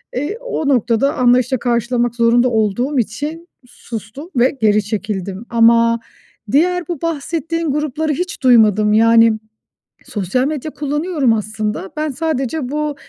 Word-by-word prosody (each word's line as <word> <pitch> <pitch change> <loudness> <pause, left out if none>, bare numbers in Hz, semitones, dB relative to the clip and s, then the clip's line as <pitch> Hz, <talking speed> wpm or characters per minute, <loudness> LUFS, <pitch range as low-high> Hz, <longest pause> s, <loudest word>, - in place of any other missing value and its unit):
Eee, 290 - -3
o - - -3
noktada 245 +1 +1
anlayışla 250 +1 +3
karşılamak 240 0 0
zorunda 240 +1 +3
olduğum 240 +5 0
için 295 +10 -4 0.2
sustum 235 - -9
ve 255 +3 +2
geri 210 -1 +3
çekildim. 205 -1 -4
Ama 230 0 +4 0.5
diğer 355 +6 +2
bu 345 -5 -5
bahsettiğin 330 0 -2
grupları 300 +1 -1
hiç 355 0 -4
duymadım. 215 -4 +4
Yani 230 +1 +5 0.7
sosyal 215 +6 -1
medya 305 0 -4
kullanıyorum 295 -3 0
aslında, 215 -2 -3
ben 305 0 -1
sadece 280 -2 -2
bu, 300 0 -2
250 Hz, 125 wpm, -17 LUFS, 225-300 Hz, 0.7 s, Yani